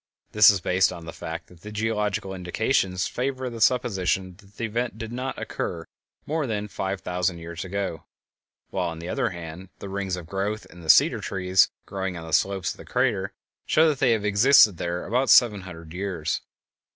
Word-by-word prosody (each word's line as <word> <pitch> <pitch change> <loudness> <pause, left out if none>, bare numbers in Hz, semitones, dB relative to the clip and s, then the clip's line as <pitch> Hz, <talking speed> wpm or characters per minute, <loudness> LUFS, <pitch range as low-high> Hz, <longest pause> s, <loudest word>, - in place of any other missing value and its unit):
This 105 0 +8
is 100 -3 +2
based 90 +1 +2
upon 85 -2 -8
the 80 - -7
fact 80 0 -6
that 85 -2 -19
the 105 - -9
geological 105 -3 -1
indications 90 0 0
favor 130 0 -3
the 115 -1 -7
supposition 95 -6 +1
that 100 0 -20
the 115 - -2
event 115 0 -2
did 115 0 -6
not 130 +2 -4
occur - - -4 0.4
more 155 -1 -1
than 105 -2 -2
five 95 -1 -3
thousand 90 0 -1
years 85 0 -7
ago, 95 -3 -4 0.7
while - - -1
on 80 - -7
the 85 +1 -7
other 125 0 0
hand 85 0 -8
the 100 - -8
rings 95 -1 -2
of 90 -2 -8
growth 100 +5 -3
in 90 - -13
the 80 - -9
cedar - - +6
trees 95 -1 +2 0.2
growing 95 -2 -4
on 80 - -8
the 80 - -8
slopes 95 -3 +1
of - - -10
the - - -11
crater - - 0 0.4
show 160 +1 +5
that 145 -4 -1
they 125 -3 +4
have 105 -2 -1
existed 105 -1 +6
there 85 +1 -3
about 125 +4 +1
seven 105 -5 +6
hundred 85 -3 -10
years. 90 -5 -2
95 Hz, 195 wpm, -25 LUFS, 90-110 Hz, 0.7 s, This